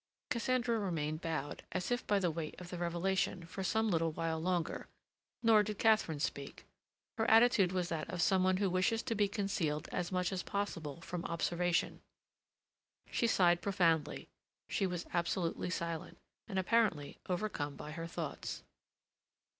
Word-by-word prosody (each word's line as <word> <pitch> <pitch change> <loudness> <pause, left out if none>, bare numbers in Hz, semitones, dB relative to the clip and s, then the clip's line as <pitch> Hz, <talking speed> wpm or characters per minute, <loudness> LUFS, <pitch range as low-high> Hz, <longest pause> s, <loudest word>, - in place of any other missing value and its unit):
Cassandra 240 -1 +1
remained 155 -5 -2
bowed, 160 -3 -3
as 180 +2 -2
if 245 +1 -1
by 205 - +3
the 180 -3 +1
weight 155 -1 -5
of 180 -1 -9
the 175 - -5
revelation, 175 +1 0
for 190 +3 -5
some 220 +2 +1
little 165 -1 +2
while 165 0 -2
longer. 175 0 -1 0.6
Nor 225 -2 +7
did 210 0 -3
Katharine 215 -9 +3
speak. 140 -1 -4 0.5
Her 225 - +2
attitude 225 -5 +6
was 180 -2 -1
that 160 -2 -3
of 180 - -4
some 185 +2 +4
one 185 0 +3
who 200 0 +2
wishes 185 +5 +1
to 245 - -1
be 205 -2 +2
concealed 195 -7 -1
as 175 0 -2
much 180 0 0
as 185 -1 -1
possible 170 -7 -3
from 175 0 -4
observation. 170 +1 0 1.1
She 235 - +2
sighed 175 -5 +4
profoundly; 170 -6 +1 0.4
she 195 - 0
was 175 -1 -3
absolutely 170 0 0
silent, 170 -3 -3 0.3
and 195 -4 -4
apparently 190 -7 +1
overcome 175 -7 -2
by 150 - -7
her 165 +2 -5
thoughts. 165 -4 -5
180 Hz, 155 wpm, -34 LUFS, 165-200 Hz, 1.1 s, Nor